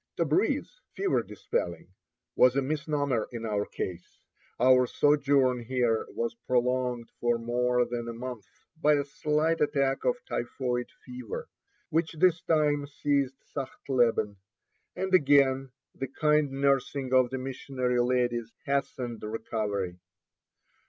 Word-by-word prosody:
Tabreez 175 Hz, -, +2 dB, 0.3 s
(fever 390 Hz, -1 st, +1 dB
dispelling) -, -, -4 dB, 0.4 s
was 125 Hz, 0 st, +5 dB
a 140 Hz, -, +3 dB
misnomer 145 Hz, -4 st, -1 dB
in 115 Hz, -2 st, -5 dB
our 105 Hz, -2 st, -1 dB
case. 90 Hz, -1 st, -6 dB, 0.4 s
Our 125 Hz, +1 st, +5 dB
sojourn 140 Hz, -3 st, +3 dB
here 120 Hz, -1 st, 0 dB
was 115 Hz, 0 st, -2 dB
prolonged 125 Hz, -1 st, 0 dB
for 120 Hz, -1 st, +2 dB
more 125 Hz, +1 st, +1 dB
than 120 Hz, -1 st, -4 dB
a 115 Hz, -, -4 dB
month 120 Hz, -5 st, -7 dB, 0.3 s
by 150 Hz, -2 st, +3 dB
a 145 Hz, -, +1 dB
slight 150 Hz, +3 st, 0 dB
attack 140 Hz, -2 st, +1 dB
of 245 Hz, -, +2 dB
typhoid 125 Hz, 0 st, -2 dB, 0.2 s
fever, 125 Hz, -3 st, -7 dB, 0.4 s
which 165 Hz, +1 st, +1 dB
this 165 Hz, +1 st, +3 dB
time 150 Hz, -3 st, +1 dB
seized 140 Hz, -2 st, 0 dB, 0.2 s
Sachtleben, 120 Hz, -6 st, 0 dB, 0.6 s
and 190 Hz, +1 st, -3 dB
again 140 Hz, -4 st, +4 dB, 0.2 s
the 135 Hz, -, -4 dB
kind 150 Hz, +2 st, +2 dB
nursing 135 Hz, -1 st, 0 dB
of 130 Hz, -1 st, +5 dB
the 130 Hz, -, -3 dB
missionary 130 Hz, -1 st, -1 dB
ladies 120 Hz, -2 st, 0 dB
hastened 130 Hz, -4 st, -2 dB
recovery. 105 Hz, -4 st, -3 dB
130 Hz, 120 wpm, -28 LUFS, 120-145 Hz, 0.6 s, was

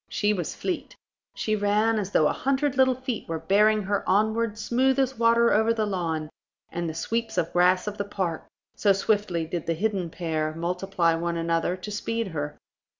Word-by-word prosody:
She 210 Hz, 0 st, +1 dB
was 175 Hz, -6 st, -3 dB
fleet; 360 Hz, -3 st, -4 dB, 0.4 s
she 215 Hz, -, 0 dB
ran 210 Hz, +2 st, +2 dB
as 195 Hz, -2 st, -3 dB
though 155 Hz, -6 st, +3 dB
a -, -, 0 dB
hundred 275 Hz, +1 st, 0 dB
little 260 Hz, -1 st, +4 dB
feet 255 Hz, -6 st, -5 dB
were 165 Hz, -, -1 dB
bearing 210 Hz, +6 st, +3 dB
her 200 Hz, +1 st, -1 dB
onward 220 Hz, +2 st, +1 dB
smooth 255 Hz, +4 st, +1 dB
as 265 Hz, -3 st, 0 dB
water 235 Hz, 0 st, +4 dB
over 220 Hz, +2 st, +3 dB
the 220 Hz, -1 st, 0 dB
lawn 165 Hz, -6 st, -2 dB, 0.4 s
and 170 Hz, -1 st, -3 dB
the 160 Hz, -, -6 dB
sweeps 225 Hz, +5 st, -2 dB
of 170 Hz, -2 st, 0 dB
grass 180 Hz, +1 st, +3 dB
of 210 Hz, 0 st, -5 dB
the -, -, +1 dB
park, 190 Hz, -5 st, -3 dB, 0.3 s
so 200 Hz, -2 st, +3 dB
swiftly 195 Hz, -4 st, 0 dB
did 170 Hz, 0 st, -5 dB
the 165 Hz, -, +1 dB
hidden 195 Hz, -1 st, -1 dB
pair 155 Hz, -2 st, -2 dB
multiply 175 Hz, 0 st, 0 dB
one 170 Hz, +1 st, -2 dB
another 165 Hz, +2 st, 0 dB
to 185 Hz, +3 st, -7 dB
speed 225 Hz, +1 st, -2 dB
her. 150 Hz, -3 st, -4 dB
200 Hz, 190 wpm, -26 LUFS, 170-220 Hz, 0.4 s, little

